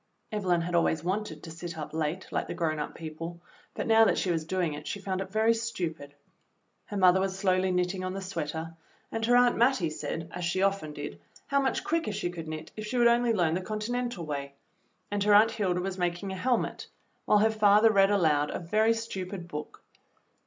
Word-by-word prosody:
Evelyn 185 Hz, -5 st, +1 dB
had 175 Hz, +1 st, -4 dB
always 165 Hz, -2 st, +2 dB
wanted 185 Hz, -4 st, -3 dB
to 165 Hz, -, -8 dB
sit 170 Hz, 0 st, -7 dB
up 155 Hz, -1 st, -6 dB
late 160 Hz, +3 st, -2 dB
like -, -, -1 dB
the -, -, -5 dB
grown 160 Hz, -3 st, -1 dB
up 150 Hz, -, -4 dB
people, 165 Hz, +2 st, -7 dB, 0.4 s
but -, -, -3 dB
now 225 Hz, 0 st, +6 dB
that 220 Hz, -, +3 dB
she 185 Hz, -, 0 dB
was 160 Hz, -2 st, -1 dB
doing 175 Hz, -2 st, -1 dB
it 150 Hz, +1 st, -8 dB
she 200 Hz, -, -3 dB
found 190 Hz, -1 st, -3 dB
it 190 Hz, -, -5 dB
very 220 Hz, +3 st, +3 dB
stupid. 175 Hz, -11 st, -4 dB, 0.7 s
Her 205 Hz, -, -5 dB
mother 185 Hz, -1 st, +5 dB
was 190 Hz, 0 st, -1 dB
slowly 185 Hz, -1 st, +2 dB
knitting 180 Hz, +1 st, 0 dB
on 185 Hz, 0 st, -3 dB
the -, -, -3 dB
sweater, 165 Hz, -3 st, -4 dB, 0.4 s
and 225 Hz, -, -3 dB
her 245 Hz, -, +5 dB
Aunt 245 Hz, 0 st, +5 dB
Mattie 235 Hz, -, +3 dB
said, 160 Hz, +1 st, -4 dB
as 180 Hz, -, -5 dB
she 180 Hz, +3 st, 0 dB
often 195 Hz, -6 st, 0 dB
did, 145 Hz, 0 st, -7 dB, 0.2 s
how 280 Hz, 0 st, +2 dB
much 265 Hz, -, 0 dB
quicker 330 Hz, -7 st, 0 dB
she 175 Hz, -3 st, -2 dB
could 165 Hz, -2 st, -7 dB
knit 155 Hz, 0 st, -6 dB
if 215 Hz, 0 st, -6 dB
she 245 Hz, -, -2 dB
would 240 Hz, -, +4 dB
only 235 Hz, 0 st, +3 dB
learn 175 Hz, -7 st, +2 dB
the 180 Hz, -, -1 dB
Continental 215 Hz, -1 st, -3 dB
way, 140 Hz, -2 st, -5 dB, 0.6 s
and 205 Hz, -1 st, 0 dB
her 205 Hz, 0 st, +5 dB
Aunt 220 Hz, +2 st, +6 dB
Hilda 185 Hz, -4 st, 0 dB
w^as 190 Hz, 0 st, -4 dB
making 175 Hz, +2 st, -1 dB
a -, -, -4 dB
helmet, 245 Hz, +5 st, -1 dB, 0.4 s
while 210 Hz, -, +5 dB
her 220 Hz, +2 st, +4 dB
father 215 Hz, +1 st, +5 dB
read 195 Hz, -2 st, +5 dB
aloud 155 Hz, -7 st, +2 dB
a -, -, -3 dB
very 215 Hz, +6 st, +2 dB
stupid 190 Hz, -5 st, -5 dB
book. 150 Hz, -2 st, -7 dB
185 Hz, 215 wpm, -29 LUFS, 165-215 Hz, 0.7 s, now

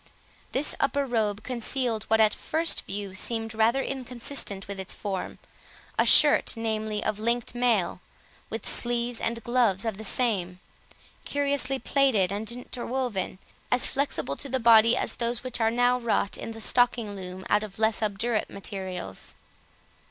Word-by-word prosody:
This 275 Hz, +3 st, +1 dB
upper 280 Hz, 0 st, +1 dB
robe 220 Hz, -4 st, -1 dB
concealed 240 Hz, -2 st, -1 dB
what 220 Hz, -, +2 dB
at 215 Hz, -1 st, +5 dB
first 325 Hz, +1 st, -1 dB
view 200 Hz, -1 st, -4 dB
seemed 225 Hz, +3 st, -2 dB
rather 230 Hz, +5 st, +2 dB
inconsistent 250 Hz, -5 st, -2 dB
with 200 Hz, -1 st, -6 dB
its 190 Hz, +1 st, -5 dB
form, 195 Hz, -3 st, -4 dB, 0.6 s
a -, -, +3 dB
shirt, -, -, +6 dB
namely, 220 Hz, -1 st, -2 dB
of 215 Hz, -1 st, -1 dB
linked 235 Hz, +2 st, -1 dB
mail, 235 Hz, -7 st, +1 dB, 0.5 s
with -, -, -5 dB
sleeves 240 Hz, 0 st, +1 dB
and 230 Hz, 0 st, -2 dB
gloves 235 Hz, -5 st, +2 dB
of 220 Hz, -4 st, -2 dB
the -, -, -6 dB
same, 195 Hz, -6 st, 0 dB, 0.6 s
curiously 280 Hz, -2 st, 0 dB
plaited 245 Hz, -8 st, +2 dB
and 210 Hz, +2 st, -2 dB
interwoven, 245 Hz, -5 st, -3 dB, 0.3 s
as 250 Hz, 0 st, +3 dB
flexible 275 Hz, -, -1 dB
to 275 Hz, -, -3 dB
the 260 Hz, +1 st, 0 dB
body 230 Hz, 0 st, +6 dB
as -, -, -3 dB
those 235 Hz, 0 st, -2 dB
which 255 Hz, -2 st, -3 dB
are 225 Hz, -, +4 dB
now 245 Hz, +2 st, +2 dB
wrought 230 Hz, -4 st, 0 dB
in 225 Hz, -, -6 dB
the 225 Hz, -, -9 dB
stocking 235 Hz, -3 st, +2 dB
loom, 185 Hz, 0 st, -8 dB
out 210 Hz, -, +3 dB
of 210 Hz, -3 st, -8 dB
less 220 Hz, 0 st, +2 dB
obdurate 215 Hz, +2 st, -1 dB
materials. 190 Hz, -, -6 dB
225 Hz, 150 wpm, -27 LUFS, 205-245 Hz, 0.6 s, shirt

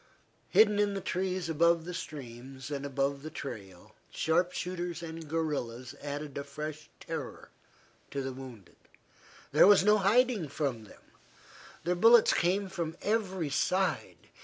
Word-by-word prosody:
Hidden 210 Hz, -1 st, +5 dB
in 205 Hz, -1 st, +2 dB
the -, -, -1 dB
trees 185 Hz, -1 st, -2 dB
above 165 Hz, +1 st, +3 dB
the 180 Hz, -, -5 dB
streams, 135 Hz, -4 st, -8 dB
and 140 Hz, 0 st, -3 dB
above 140 Hz, 0 st, -1 dB
the 155 Hz, -, -6 dB
trail, 100 Hz, -, -8 dB, 0.2 s
sharp 175 Hz, +3 st, +1 dB
shooters 175 Hz, -2 st, -4 dB
and 160 Hz, -1 st, -7 dB
guerillas 135 Hz, -7 st, -3 dB
added 145 Hz, 0 st, -5 dB
a -, -, -4 dB
fresh 150 Hz, +2 st, -7 dB
terror -, -, -7 dB, 0.6 s
to 140 Hz, -1 st, -3 dB
the 135 Hz, 0 st, -4 dB
wounded. 125 Hz, -7 st, -11 dB, 0.7 s
There -, -, +7 dB
was 205 Hz, -2 st, +7 dB
no 210 Hz, +1 st, +5 dB
hiding 215 Hz, -2 st, +3 dB
from 135 Hz, -7 st, -2 dB
them. -, -, -17 dB, 0.8 s
Their 175 Hz, +2 st, +1 dB
bullets 225 Hz, +5 st, +6 dB
came 190 Hz, +3 st, +1 dB
from 170 Hz, -4 st, -4 dB
every 190 Hz, -8 st, -1 dB
side. 180 Hz, +2 st, 0 dB
160 Hz, 140 wpm, -30 LUFS, 140-185 Hz, 0.8 s, There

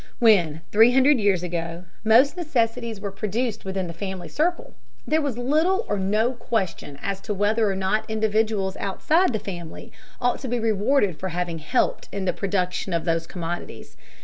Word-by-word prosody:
When, 175 Hz, -9 st, +4 dB
three 225 Hz, +4 st, +6 dB
hundred 265 Hz, +1 st, +5 dB
years 200 Hz, -4 st, +2 dB
ago, 170 Hz, 0 st, -4 dB, 0.2 s
most 235 Hz, +8 st, +5 dB
necessities 235 Hz, -, -1 dB
were 200 Hz, 0 st, -4 dB
produced 220 Hz, +3 st, -2 dB
within 190 Hz, -1 st, -2 dB
the 170 Hz, -, -6 dB
family 185 Hz, 0 st, -5 dB
circle, 340 Hz, -, -1 dB, 0.3 s
there 315 Hz, +1 st, +2 dB
was 280 Hz, -6 st, -2 dB
little 315 Hz, -, +1 dB
or 205 Hz, -, -1 dB
no 215 Hz, +5 st, +1 dB
question 190 Hz, -, -3 dB
as 195 Hz, -1 st, -3 dB
to 210 Hz, 0 st, -3 dB
whether 210 Hz, +2 st, +2 dB
or 195 Hz, -, -1 dB
not 195 Hz, +4 st, -1 dB
individuals 215 Hz, -3 st, 0 dB
outside 315 Hz, -, +1 dB
the 220 Hz, -, 0 dB
family 175 Hz, -5 st, -8 dB, 0.3 s
ought 245 Hz, -1 st, +1 dB
to 265 Hz, -, -6 dB
be 245 Hz, 0 st, -1 dB
rewarded 215 Hz, -, +1 dB
for 190 Hz, -, -3 dB
having 175 Hz, -1 st, -3 dB
helped 155 Hz, -, 0 dB
in 195 Hz, -1 st, -3 dB
the 180 Hz, -, +1 dB
production 185 Hz, -1 st, -2 dB
of 170 Hz, -, -1 dB
those 165 Hz, -1 st, 0 dB
commodities. 175 Hz, -1 st, -6 dB
205 Hz, 175 wpm, -24 LUFS, 185-235 Hz, 0.3 s, three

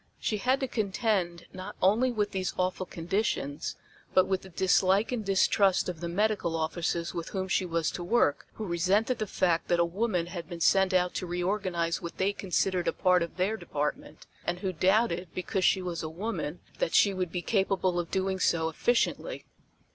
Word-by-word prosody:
She 215 Hz, -, -1 dB
had 255 Hz, +6 st, +1 dB
to 265 Hz, -, 0 dB
contend 200 Hz, -6 st, -1 dB
not 185 Hz, +2 st, -7 dB
only 220 Hz, +7 st, +3 dB
with 210 Hz, -3 st, -1 dB
these 185 Hz, -1 st, -2 dB
awful 185 Hz, 0 st, -1 dB
conditions, 165 Hz, -5 st, -2 dB, 0.4 s
but 185 Hz, -, +6 dB
with 190 Hz, 0 st, -1 dB
the 190 Hz, -, -12 dB
dislike 190 Hz, +4 st, +2 dB
and 240 Hz, -3 st, -2 dB
distrust 195 Hz, 0 st, +3 dB
of 175 Hz, -3 st, -4 dB
the 170 Hz, 0 st, -4 dB
medical 205 Hz, -2 st, 0 dB
officers 170 Hz, +1 st, -1 dB
with 170 Hz, -2 st, -4 dB
whom 190 Hz, -1 st, -3 dB
she 185 Hz, 0 st, +1 dB
was 165 Hz, -2 st, 0 dB
to 175 Hz, -, -5 dB
work, 175 Hz, -6 st, +2 dB
who 220 Hz, -, -5 dB
resented 195 Hz, +7 st, +1 dB
the 215 Hz, -, -2 dB
fact 175 Hz, -3 st, +1 dB
that 175 Hz, -, +2 dB
a 170 Hz, -, +4 dB
woman 180 Hz, 0 st, -1 dB
had 175 Hz, 0 st, -7 dB
been 170 Hz, -2 st, -6 dB
sent 190 Hz, +3 st, +4 dB
out 180 Hz, -1 st, +2 dB
to 180 Hz, -, -3 dB
reorganize 175 Hz, -1 st, -1 dB
what 170 Hz, -, -7 dB
they 195 Hz, +2 st, +1 dB
considered 185 Hz, -2 st, 0 dB
a -, -, +2 dB
part 180 Hz, -1 st, +3 dB
of 170 Hz, +1 st, -4 dB
their 190 Hz, +4 st, +1 dB
department, 150 Hz, -5 st, -4 dB, 0.2 s
and 175 Hz, +1 st, -3 dB
who 190 Hz, -2 st, -2 dB
doubted, 185 Hz, +1 st, +2 dB
because 185 Hz, +1 st, -2 dB
she 190 Hz, 0 st, +3 dB
was 175 Hz, -2 st, -3 dB
a 155 Hz, -, -4 dB
woman, 175 Hz, -2 st, -4 dB, 0.2 s
that -, -, 0 dB
she 200 Hz, -, +5 dB
would 185 Hz, -3 st, -2 dB
be 175 Hz, 0 st, -3 dB
capable 190 Hz, -3 st, +1 dB
of 170 Hz, -, -3 dB
doing 190 Hz, 0 st, -1 dB
so 160 Hz, -2 st, +2 dB
efficiently. 240 Hz, -, 0 dB
185 Hz, 195 wpm, -29 LUFS, 170-200 Hz, 0.4 s, but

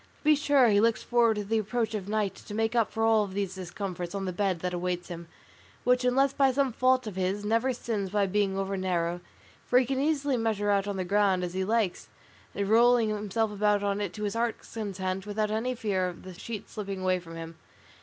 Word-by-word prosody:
To -, -, -31 dB
be 305 Hz, 0 st, +6 dB
sure 285 Hz, -3 st, +4 dB
he 205 Hz, -1 st, +4 dB
looks 230 Hz, 0 st, +2 dB
forward 235 Hz, -2 st, +3 dB
to 210 Hz, -, -2 dB
the 220 Hz, +2 st, 0 dB
approach 220 Hz, +1 st, -1 dB
of 205 Hz, -2 st, -4 dB
night 210 Hz, -3 st, 0 dB
to 205 Hz, -, -10 dB
make 225 Hz, +2 st, 0 dB
up 230 Hz, -3 st, +2 dB
for 225 Hz, -, -2 dB
all 220 Hz, -2 st, +4 dB
these 195 Hz, -1 st, -3 dB
discomforts 180 Hz, -1 st, -5 dB
on 195 Hz, -1 st, -3 dB
the 185 Hz, -, -3 dB
bed 185 Hz, -2 st, -1 dB
that 180 Hz, 0 st, -2 dB
awaits 180 Hz, 0 st, -3 dB
him, 170 Hz, -1 st, -7 dB, 0.6 s
which, 250 Hz, 0 st, +3 dB
unless 270 Hz, +2 st, +3 dB
by 270 Hz, -1 st, +3 dB
some 270 Hz, -1 st, +1 dB
fault 255 Hz, +1 st, +2 dB
of 210 Hz, -4 st, -6 dB
his, 190 Hz, +2 st, -1 dB
never 230 Hz, +5 st, +2 dB
sins 220 Hz, -5 st, -3 dB
by 205 Hz, +1 st, +1 dB
being 195 Hz, 0 st, 0 dB
over 195 Hz, 0 st, -2 dB
narrow, 175 Hz, -2 st, -1 dB, 0.5 s
for 245 Hz, -, +4 dB
he 255 Hz, -, +4 dB
can 265 Hz, +2 st, -1 dB
easily 285 Hz, -3 st, +1 dB
measure 215 Hz, -3 st, 0 dB
out 200 Hz, 0 st, +1 dB
on 200 Hz, -1 st, -3 dB
the 185 Hz, -, -2 dB
ground 195 Hz, -1 st, +2 dB
as 175 Hz, -1 st, -4 dB
he 190 Hz, 0 st, -1 dB
likes, 215 Hz, -2 st, 0 dB, 0.5 s
and 200 Hz, -1 st, -1 dB
roll 240 Hz, +3 st, +5 dB
himself 215 Hz, -1 st, -1 dB
about 205 Hz, 0 st, +1 dB
in 200 Hz, 0 st, 0 dB
it 200 Hz, -4 st, -2 dB
to 210 Hz, -, -6 dB
his 205 Hz, -, -1 dB
heart's 230 Hz, 0 st, -3 dB
content 195 Hz, -3 st, -3 dB
without 210 Hz, 0 st, -1 dB
any 240 Hz, +4 st, -1 dB
fear 200 Hz, -5 st, 0 dB
of 175 Hz, -1 st, -8 dB
the 185 Hz, -, -9 dB
sheets 210 Hz, +4 st, -7 dB
slipping 195 Hz, -3 st, -5 dB
away 185 Hz, -1 st, +2 dB
from 165 Hz, -1 st, -11 dB
him. 165 Hz, 0 st, -7 dB
205 Hz, 230 wpm, -28 LUFS, 190-230 Hz, 0.6 s, be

